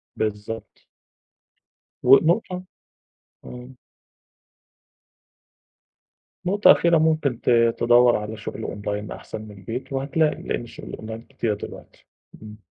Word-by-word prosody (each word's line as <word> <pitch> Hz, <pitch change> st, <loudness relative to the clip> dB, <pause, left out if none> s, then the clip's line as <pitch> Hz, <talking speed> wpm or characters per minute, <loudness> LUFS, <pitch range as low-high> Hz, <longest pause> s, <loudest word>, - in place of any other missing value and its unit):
بالضبط. 110 Hz, +1 st, -5 dB, 1.2 s
ونقطة 170 Hz, -, +4 dB, 0.8 s
امم. 125 Hz, +1 st, -10 dB, 2.7 s
نقطة 205 Hz, +3 st, +6 dB
أخيرة، 170 Hz, -1 st, +4 dB
ممكن 155 Hz, -6 st, +1 dB
ت -, -, -1 dB, 0.3 s
تدوّر 120 Hz, 0 st, +5 dB
على 105 Hz, +1 st, -4 dB
شُغل 110 Hz, -, -6 dB
Online 105 Hz, +1 st, -4 dB
أحسن -, -, -8 dB
من 110 Hz, -1 st, -11 dB
البيت 115 Hz, +7 st, -7 dB
وهتلاقي، 145 Hz, +3 st, 0 dB
لإن -, -, -3 dB
شُغل 115 Hz, -, -11 dB
الOnline 110 Hz, +1 st, -9 dB
كتير 110 Hz, -3 st, -1 dB
دلوقتي. 105 Hz, -, -10 dB, 0.3 s
امم. 105 Hz, -1 st, -12 dB
120 Hz, 100 wpm, -23 LUFS, 110-150 Hz, 2.7 s, نقطة